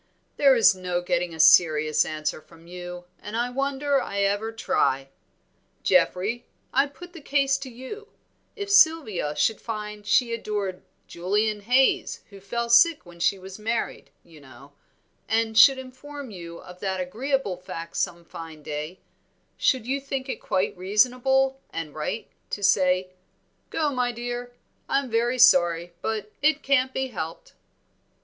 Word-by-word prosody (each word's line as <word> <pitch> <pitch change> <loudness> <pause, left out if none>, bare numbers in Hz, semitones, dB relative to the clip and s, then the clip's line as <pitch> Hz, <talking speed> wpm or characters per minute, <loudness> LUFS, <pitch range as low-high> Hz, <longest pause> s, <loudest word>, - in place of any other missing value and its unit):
"There 275 -2 +6
is 230 -4 +6
no 180 -1 -2
getting 175 0 0
a 160 - -10
serious 155 -1 +5
answer 155 0 -3
from 165 +1 -19
you, 180 0 -8
and 210 +2 -6
I 240 +1 -1
wonder 275 +1 0
I 200 0 -3
ever 205 +3 0
try. 135 -11 0 0.7
Geoffrey, 210 +7 +1 0.3
I 275 +2 +3
put 350 +5 -13
the 335 - -10
case 275 -1 +2
to 270 -1 -7
you; 260 - -9 0.5
if 405 -2 -5
Sylvia 315 - +4
should 175 +9 +1
find 210 -2 -6
she 235 +3 +2
adored 205 -5 -3 0.2
Julian 205 +4 -1
Haize, 255 +3 +2
who 200 - -12
fell 235 +5 -3
sick 290 - +5
when 175 0 -15
she 195 +3 +2
was 190 +2 -10
married, 225 +2 -3
you 160 -3 -17
know, 140 +1 -15 0.6
and 225 0 +1
should 265 +4 +8
inform 260 +1 -9
you 170 -3 -9
of 180 0 -13
that 190 -1 -2
agreeable 225 +3 -1
fact 170 -2 -8
some 170 0 -2
fine 160 -2 -10
day, 150 +5 -6 0.5
should 255 -4 +1
you 275 +3 -1
think 270 -1 -4
it 265 - -5
quite 185 - -1
reasonable 255 +8 +2
and 160 -3 -6
right 155 +8 -4 0.2
to 205 - -5
say, 185 -2 +3 0.6
'Go, 305 -2 0
my 250 -2 0
dear, 245 +1 -5 0.4
I'm 275 -3 0
very 240 +2 +1
sorry, 175 -7 +4
but 215 -1 -3
it 305 0 +2
can't 265 -1 +2
be 265 0 -2
helped.'" 165 -7 -7
215 Hz, 150 wpm, -25 LUFS, 180-260 Hz, 0.7 s, should